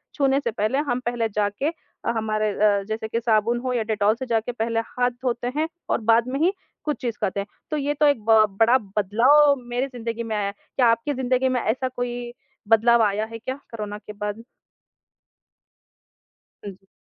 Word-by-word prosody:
छूने 275 -3 +2
से 240 -4 -2
पहले 215 +3 0
हम 245 +1 +1
पहले 235 -1 0
जाके 205 +5 -1
अ, 325 -7 -6
हमारे 215 -1 0
अ, 200 0 +2
जैसे 220 0 -3
कि 230 +1 -1
साबुन 230 0 +2
हो 255 0 -2
या 235 - 0
डेटॉल 215 -1 +1
से 260 +3 -5
जाके 230 -1 0
पहले 230 -1 -1
हाथ 245 0 0
धोते 245 -1 -1
हैं 315 +1 +1 0.2
और - - +1
बाद 230 +1 +4
में 265 +2 -2
ही 350 +5 +3 0.3
कुछ 300 -1 -1
चीज़ 235 -4 -3
करते 195 - -1
हैं। 200 - -4 0.2
तो 305 - 0
ये 290 0 0
तो 300 - +5
एक 285 -6 +2
ब 220 -1 +7
बड़ा 235 +3 +6 0.2
बदलाव 260 +9 +5
मेरी 245 +3 -1
ज़िंदगी 235 -2 -5
में 220 -1 -3
आया 205 - 0
है। - - -2 0.2
क्या 250 -3 +4
आपकी 230 +5 +1
ज़िंदगी 260 0 +1
में 250 -2 0
ऐसा 260 +4 0
कोई 245 -1 -4 0.3
बदलाव 230 +2 +5
आया 210 +1 +1
है 225 +1 -8
क्या 260 +3 -4 0.2
कोरोना 210 -2 -5
के 210 - -10
बाद? 210 +2 -5 2.2
हाँ 205 - -5
जी। 195 0 -20
230 Hz, 200 wpm, -24 LUFS, 215-255 Hz, 2.2 s, ब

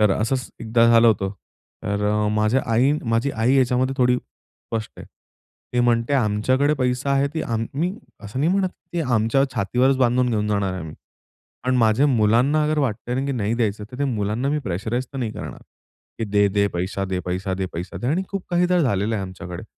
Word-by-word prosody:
तर 105 -2 +4
असंच 125 +5 -1
एकदा 115 +1 +3
झालं 115 0 +6
होतं, 100 -3 +1 0.5
तर 100 0 -1
अ, 105 0 +1
माझ्या 110 +5 +2
आई 130 +5 +4
माझी 115 +4 +1
आई 115 +2 +1
याच्यामध्ये 130 0 +2
थोडी 125 0 +4
स्पष्ट 115 -2 -8
आहे. - - -10 0.7
ती 125 - +2
म्हणते 120 +2 +2
आमच्याकडे 130 +5 +2
पैसा 130 +1 -1
आहे 140 +1 +2
ती 160 - -1
आम्ही 125 +10 -2 0.3
असं 105 +5 -6
नाही 155 +4 +2
म्हणत 195 -1 +1 0.2
ती 175 - -1
आमच्या 120 -1 +2
छातीवरच 125 +5 +2
बांधून 125 0 +2
घेऊन 105 -2 0
जाणार 100 -2 0
आहे 95 - -5
आम्ही, 80 -1 -8 0.7
पण 130 0 +2
माझ्या 115 +3 +4
मुलांना 125 +4 +3
अगर 155 0 0
वाटतंय 125 -3 -1
ना 130 +2 -1
की 140 - -1
नाही 115 -3 -1
द्यायचं, 105 -3 -1
तर 125 - -9
त्या 140 - 0
मुलांना 110 +2 -1
मी 150 +1 +1
प्रेशराइज 110 +4 -3
तर 135 - -5
नाही 120 -4 -2
करणार - - -8 0.6
की 115 - -1
दे, 105 0 +3
दे. 100 +1 +2
पैसा 95 +2 -2
दे, 95 -1 -2
पैसा 95 +1 -2
दे, 95 0 -2
पैसा 90 +3 -6
दे. 120 - -4
आणि 165 +8 +1
खूप 195 -2 -4
काहीदा 180 +1 +2
झालेलं 110 - +1
आहे 100 - -2
आमच्याकडे. 95 -1 -7
115 Hz, 195 wpm, -22 LUFS, 105-135 Hz, 0.7 s, झालं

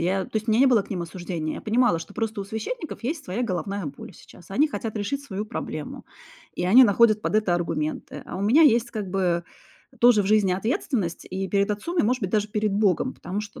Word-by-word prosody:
я 185 +3 0
то - - -13
есть 220 +1 -2
у - - +4
меня 220 +3 +3
не 275 - +6
было 240 -6 +4
к - - -18
ним 180 -3 -2
осуждения. 170 -2 -4
Я - - -7
понимала, 230 -5 +2
что 165 +5 -10
просто 225 -2 -2
у - - -4
священников 220 - -5
есть 295 +5 -3
своя 230 +1 -3
головная 195 -3 -3
боль 140 - -9
сейчас, 175 - -16
они 285 +11 +2
хотят 225 -6 -5
решить 265 +7 -2
свою 210 -6 -5
проблему 215 - -6 0.5
и - - -2
они 245 +8 +8
находят 215 0 +4
под - - -2
это 210 -5 +2
аргументы. 165 -3 -3
А - - -6
у - - -4
меня 235 +11 +5
есть 235 -5 +4
как 210 -4 -4
бы, 180 -3 0 0.5
э, - - -21
тоже 235 -3 +6
в - - -4
жизни 205 -2 +3
ответственность 205 - -2
и 190 0 -3
перед 200 +1 +1
отцом, 270 - -3
и, - - +5
может 250 +4 +1
быть 190 - -1
даже, 210 0 +1
перед 210 -1 -1
Богом. 205 +4 +1
Потому 195 +3 -5
что, 210 -1 -9
210 Hz, 240 wpm, -25 LUFS, 185-235 Hz, 0.5 s, они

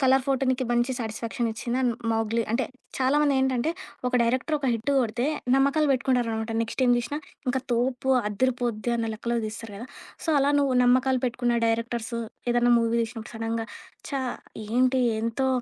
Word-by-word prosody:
'Colour 265 -1 +4
photo' 270 -1 +1
నీకు 260 0 +1
మంచి 240 +2 +2
satisfaction 230 +1 -3
ఇచ్చిందా? 240 +3 -2 0.3
'మౌగ్లీ' 225 +1 +1
అంటే 235 +2 +1 0.3
చాలామందేంటంటే, 265 0 +2 0.4
ఒక 250 - -1
డైరెక్టర్ 255 +6 +1
ఒక 275 - -2
హిట్ 230 +5 -2
గొడితే 240 0 0 0.3
నమ్మకాలు 280 +3 +3
పెట్టుకుంటారనమాట 230 -3 0
నెక్స్ట 230 +3 0
ఏం 245 - +5
తీసినా, 285 +5 -3 0.3
ఇంకా 260 +1 +1
తోపు, 250 +2 0 0.2
అద్దిరిపోద్ది 240 0 -1
అన్న 225 -1 -1
లెక్కలో 235 +2 -2
తీస్తారు 220 0 -7
గదా! 235 +5 -7 0.4
సో, - - -12
అలా 285 +1 +3
నువ్వు 270 -3 +2
నమ్మకాలు 255 +1 +3
పెట్టుకున్న 240 -1 0
డైరెక్టర్సు 230 +1 -1 0.3
ఏదన్న 240 0 +3
మూవీస్ 230 0 0
ఇప్పుడు 225 +2 -8
సడెన్‌గా 225 0 -2 0.4
ఛా! 275 -1 -1 0.5
ఏంటి 255 +3 +3 0.2
ఎంతో 230 +4 0
245 Hz, 150 wpm, -26 LUFS, 230-265 Hz, 0.5 s, ఏం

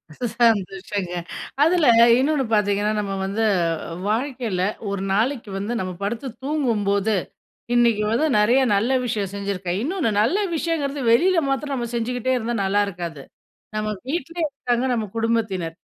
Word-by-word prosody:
ச - - -25 0.2
சந்தோஷங்க 195 -4 +1 0.5
அதுல 330 -1 +3 0.3
இன்னொன்னு 280 +2 +2
பாத்தீங்கன்னா, 205 0 +2
நம்ம 200 -1 -2
வந்து 210 +3 0 0.6
வாழ்க்கையில 235 -4 -1 0.3
ஒரு 200 -1 -3
நாளைக்கு 230 +2 0
வந்து 205 +4 -3
நம்ம 185 -1 -3
படுத்து 230 +6 -3 0.2
தூங்கும்போது 220 -8 +1 0.6
"இன்னைக்கு 235 -3 +3
வந்து 290 +8 +2
நிறையா 240 +6 +4
நல்ல 220 +6 +1
விஷயம் 205 -5 -2
செஞ்சிருக்கேன்." 195 -2 -3
இன்னொன்னு 315 - 0
நல்ல 240 - +2 0.2
விஷயங்கறது 295 -4 -1
வெளியில 350 +9 +4
மாத்ரம் 275 +1 -1
நம்ம 240 -2 -2
செஞ்சுகிட்டே 245 +2 -1
இருந்தா 235 0 -2
நல்லாருக்காது. 185 -6 -1 0.5
நம்ம 215 0 -1 0.2
வீட்லேயே 330 +2 -2
இருக்காங்க 250 -3 -1
நம்ம 225 -2 -1
குடும்பத்தினர். 215 -8 -1
225 Hz, 130 wpm, -22 LUFS, 200-270 Hz, 0.6 s, நிறையா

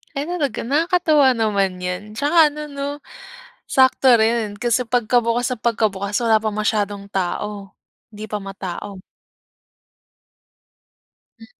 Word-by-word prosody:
Ay 280 - -1
talaga, 340 -6 -2
nakakatuwa 310 +1 +3
naman 200 -4 0
'yan. 180 +2 -3
Tsaka 290 +4 0
ano 300 +1 -8
‘no, 280 0 -4 0.8
sakto 260 0 +3
rin 220 -2 +1
kasi 240 +3 +1
pagkabukas 240 +1 +1
na - - -8
pagkabukas, 205 -3 0
wala 220 -2 +3
pang 215 -1 -2
masyadong 205 -2 -1
tao. 195 +1 -4 0.4
‘Di 215 -1 -8
pa 210 - -3
matao. 195 0 -7 2.4
Hmm. 225 - -13
220 Hz, 115 wpm, -20 LUFS, 205-260 Hz, 2.4 s, nakakatuwa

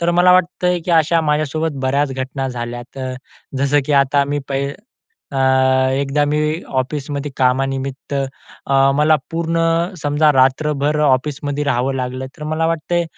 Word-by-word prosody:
तर 170 0 +1
मला 180 0 +6
वाटत 180 0 +1
आहे 180 0 +2
की 170 - -4
अशा 165 +2 +2
माझ्यासोबत 155 0 -1
बऱ्याच 135 +1 +1
घटना 130 +1 -3
झाल्यात, 120 +1 -7
अ, 130 -1 -4 0.4
जसं 140 +1 +2
की 150 - 0
आता 140 +1 +1
मी - - 0
पै 135 0 -1 0.7
अ, - - -4 0.6
एकदा 140 +2 +1
मी 150 +1 0 0.4
ऑफिसमध्ये 145 +1 -4
कामानिमित्त 135 +2 -1 0.5
अ, 135 - 0 0.2
मला 155 +1 +4
पूर्ण 165 0 -1 0.4
समजा 150 +1 +3
रात्रभर 145 +3 +2
ऑफिसमध्ये 145 +1 0
राहावं 135 -1 0
लागलं, 130 0 -4
तर 150 - -9
मला 155 +1 0
वाटत 165 +1 -3
आहे 175 0 +2
145 Hz, 150 wpm, -18 LUFS, 135-155 Hz, 0.7 s, मला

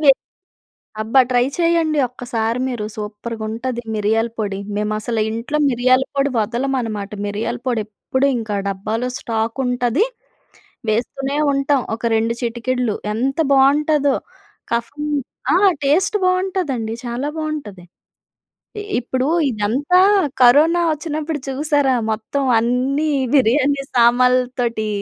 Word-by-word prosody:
మేము 275 -1 +7 0.9
అబ్బ! 225 +4 -9 0.2
ట్రై 245 -1 +3
చేయండి 335 -3 +2
ఒక్కసారి 235 -1 -2
మీరు 235 -4 -3
సూప్పర్‌గా 215 +2 -6
ఉంటది 240 +2 -4
మిరియాల 220 +2 +1
పొడి. 200 -3 -2 0.2
మేము 210 0 -1
అసలు 225 0 -2
ఇంట్లో 240 +7 -2
మిరియాల 255 +1 +3
పొడి 275 0 +2
వదలమన్నమాట. 230 -2 -2 0.2
మిరియాల 225 +4 -3
పొడి 235 -3 +1
ఎప్పుడు 260 +6 -1
ఇంకా 220 -3 -3
డబ్బాలో 215 +6 -2
స్టాక్ 225 +2 -2
ఉంటది. 245 - +1 0.8
వేస్తూనే 270 +6 -1 0.2
ఉంటాం. 275 0 +1
ఒక 225 - -10
రెండు 225 +1 0
చిటికెడులు. 240 -1 -1 0.2
ఎంత 265 +6 -1
బాగుంటదో! 285 +1 +3 0.6
కఫం 235 +6 -2 0.5
ఆ! - - +5 0.3
టేస్ట్ 365 +9 +2
బాగుంటదండి. 365 - 0
చాలా 245 +4 -3
బాగుంటది. 290 - -5 1.0
ఇ - - -4 0.2
ఇప్పుడు 255 +2 -2 0.2
ఇదంతా 250 - +1 0.4
కరోనా 305 +8 +6
ఒచ్చినప్పుడు 305 0 -4
చూసారా? 285 -1 +1 0.2
మొత్తం 220 +6 -2 0.2
అన్నీ 255 +6 +1 0.2
బిర్యానీ 275 +2 +3
సామాన్లతోటి 245 -1 +2
250 Hz, 110 wpm, -19 LUFS, 225-280 Hz, 1.0 s, మేము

